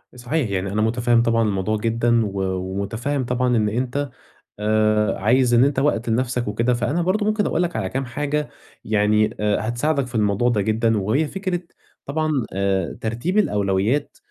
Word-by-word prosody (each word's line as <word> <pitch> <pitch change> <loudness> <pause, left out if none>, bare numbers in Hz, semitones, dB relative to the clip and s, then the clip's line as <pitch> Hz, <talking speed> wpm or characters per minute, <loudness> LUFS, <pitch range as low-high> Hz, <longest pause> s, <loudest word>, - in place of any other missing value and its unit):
صحيح، 125 +1 -2
يعني 95 0 -2
أنا 105 +1 0
مُتفهِّم 120 +1 +2
طبعًا 115 0 +2
الموضوع 105 0 0
جدًا 115 +1 +1
و 100 -1 -3
ومُتفهِّم 100 +9 -3
طبعًا 125 0 +1
إن 105 -1 +2
أنت 130 +5 -2 0.5
آآ 110 0 +2
عايز 120 +4 +3
إن 120 +1 +6
أنت 140 -1 +1
وقت 125 -5 0
لنَفْسك 120 +1 0
وكده، 115 +4 +1
فأنا 125 +8 0
برضه 190 +5 0
ممكن 215 -1 +1
أقول 170 - +1
لك 175 -1 -3
على 95 - -2
كام 135 +4 -2
حاجة 145 +4 -2 0.4
يعني 105 0 +2
آآ 105 +1 0
هتساعدك 140 +3 0
في 120 - -10
الموضوع 105 +2 +2
ده 110 -4 +1
جدًا 110 +2 +1
وهي 110 +11 +1
فكرة 185 0 -3 0.5
طبعًا 155 +2 -1 0.2
آآ 95 -2 -1
ترتيب 120 - -2
الأولويات 105 - +1
115 Hz, 170 wpm, -22 LUFS, 105-140 Hz, 0.5 s, إن